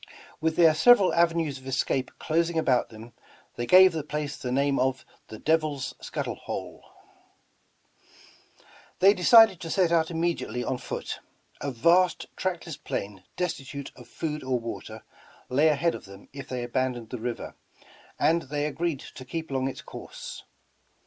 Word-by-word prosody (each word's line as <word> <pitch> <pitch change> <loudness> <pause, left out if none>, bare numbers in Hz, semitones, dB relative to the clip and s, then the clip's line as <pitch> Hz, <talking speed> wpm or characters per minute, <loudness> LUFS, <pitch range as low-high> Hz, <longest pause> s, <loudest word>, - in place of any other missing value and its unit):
With 160 0 0
their 165 -2 +6
several 200 +4 +6
avenues 165 -4 +1
of 130 - -14
escape 130 0 0
closing 165 +1 0
about 130 -6 +2
them, 110 +1 -12 0.4
they 120 - -3
gave 185 0 +8
the 160 -3 -3
place 150 0 -4
the 125 - -5
name 140 +1 +1
of 130 -1 0 0.2
the 110 - -9
''Devil's 155 -2 0
Scuttle - - -4
Hole.'* - - -7 2.2
Thej^ 195 +2 +6
decided 220 -1 +7
to 165 - -6
set 180 -1 +2
out 165 -1 +3
immediately 165 -7 -2
on 125 - -2
foot. - - -5 0.4
A 140 - -2
vast 170 +8 +3
tractless 175 -4 -3
plain 100 -2 -4
destitute 140 -5 -4
of 125 -2 -14
food 150 +3 -4
or 130 -1 0
water, 110 -1 -7 0.5
la}^ 145 +5 +4
ahead 155 +3 +1
of - - -8
them 100 0 -14
if 140 -1 -8
they 125 -1 -3
abandoned 120 -2 -2
the 125 - -4
river, 120 +1 -5 0.7
and 165 +1 +3
they 145 0 -1
agreed 155 -1 -2
to 130 - -10
keep 160 +4 -5
along 130 -1 0
its 135 - -6
course. - - -9
145 Hz, 155 wpm, -27 LUFS, 130-170 Hz, 2.2 s, gave